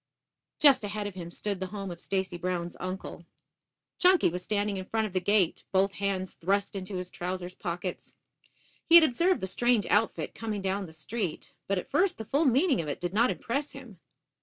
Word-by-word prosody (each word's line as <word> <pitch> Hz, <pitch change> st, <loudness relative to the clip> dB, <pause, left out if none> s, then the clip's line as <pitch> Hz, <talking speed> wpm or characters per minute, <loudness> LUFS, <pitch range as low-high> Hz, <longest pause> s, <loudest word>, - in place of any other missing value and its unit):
Just 280 Hz, -6 st, +6 dB
ahead 205 Hz, 0 st, -3 dB
of 205 Hz, -, -4 dB
him 175 Hz, -2 st, -7 dB
stood 200 Hz, +2 st, -3 dB
the 190 Hz, -, -3 dB
home 195 Hz, -1 st, -6 dB
of 170 Hz, -, -8 dB
Stacy 190 Hz, -1 st, -2 dB
Brown's 175 Hz, 0 st, -3 dB
uncle. 185 Hz, +2 st, -6 dB, 0.8 s
Chunky 365 Hz, -, +5 dB
was 180 Hz, +1 st, -4 dB
standing 205 Hz, 0 st, -1 dB
in 185 Hz, -, -5 dB
front 220 Hz, -1 st, +1 dB
of 205 Hz, -, -6 dB
the 185 Hz, -, +2 dB
gate, 195 Hz, -1 st, +2 dB
both 195 Hz, +1 st, +3 dB
hands 195 Hz, -2 st, -2 dB
thrust 200 Hz, +4 st, -1 dB
into 190 Hz, 0 st, -5 dB
his 180 Hz, 0 st, -5 dB
trousers 180 Hz, 0 st, -4 dB
pockets. 175 Hz, +1 st, -5 dB, 0.7 s
He 335 Hz, -, +8 dB
had 340 Hz, -, +11 dB
observed 335 Hz, +6 st, +2 dB
the -, -, -1 dB
strange 240 Hz, +3 st, +2 dB
outfit 215 Hz, +2 st, +1 dB
coming 215 Hz, -3 st, -4 dB
down 195 Hz, 0 st, -1 dB
the -, -, -12 dB
street, 165 Hz, +4 st, -5 dB
but 195 Hz, -, 0 dB
at 180 Hz, -, -5 dB
first 360 Hz, +5 st, +2 dB
the 220 Hz, -, -6 dB
full 285 Hz, +8 st, +1 dB
meaning 270 Hz, -, +3 dB
of 155 Hz, -, -7 dB
it 145 Hz, -, -3 dB
did 175 Hz, +1 st, -3 dB
not 235 Hz, +4 st, +4 dB
impress 280 Hz, +5 st, -3 dB
him. -, -, -12 dB
200 Hz, 200 wpm, -29 LUFS, 180-225 Hz, 0.8 s, had